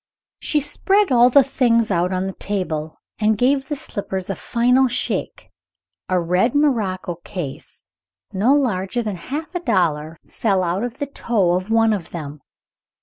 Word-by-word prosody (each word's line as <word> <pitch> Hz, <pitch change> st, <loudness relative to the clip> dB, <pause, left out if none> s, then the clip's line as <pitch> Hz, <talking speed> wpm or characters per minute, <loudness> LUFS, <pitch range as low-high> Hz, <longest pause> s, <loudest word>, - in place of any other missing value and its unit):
She 300 Hz, -, +1 dB
spread 385 Hz, +6 st, +2 dB
all 245 Hz, 0 st, +6 dB
the 275 Hz, +2 st, +6 dB
things 235 Hz, -4 st, +2 dB
out 180 Hz, 0 st, +1 dB
on 185 Hz, 0 st, -1 dB
the 190 Hz, -, -4 dB
table, 160 Hz, -7 st, -3 dB, 0.2 s
and 215 Hz, 0 st, +2 dB
gave 265 Hz, +3 st, +2 dB
the 295 Hz, -, -1 dB
slippers 195 Hz, -7 st, -3 dB
a -, -, -3 dB
final 250 Hz, +7 st, +2 dB
shake. 250 Hz, +1 st, -3 dB, 0.6 s
A 185 Hz, -1 st, +2 dB
red 180 Hz, +9 st, +1 dB
morocco 205 Hz, -, 0 dB
case, 170 Hz, -9 st, -6 dB, 0.5 s
no 205 Hz, +7 st, +2 dB
larger 235 Hz, -4 st, 0 dB
than 210 Hz, -3 st, -3 dB
half 290 Hz, -, -6 dB
a 355 Hz, -, -1 dB
dollar, 165 Hz, -, 0 dB
fell 195 Hz, -4 st, 0 dB
out 180 Hz, +4 st, -1 dB
of 245 Hz, -1 st, -4 dB
the 285 Hz, -, -2 dB
toe 230 Hz, -9 st, 0 dB
of 185 Hz, +3 st, -2 dB
one 225 Hz, 0 st, +3 dB
of 185 Hz, -6 st, -4 dB
them. 150 Hz, -3 st, -7 dB
210 Hz, 160 wpm, -21 LUFS, 185-255 Hz, 0.6 s, all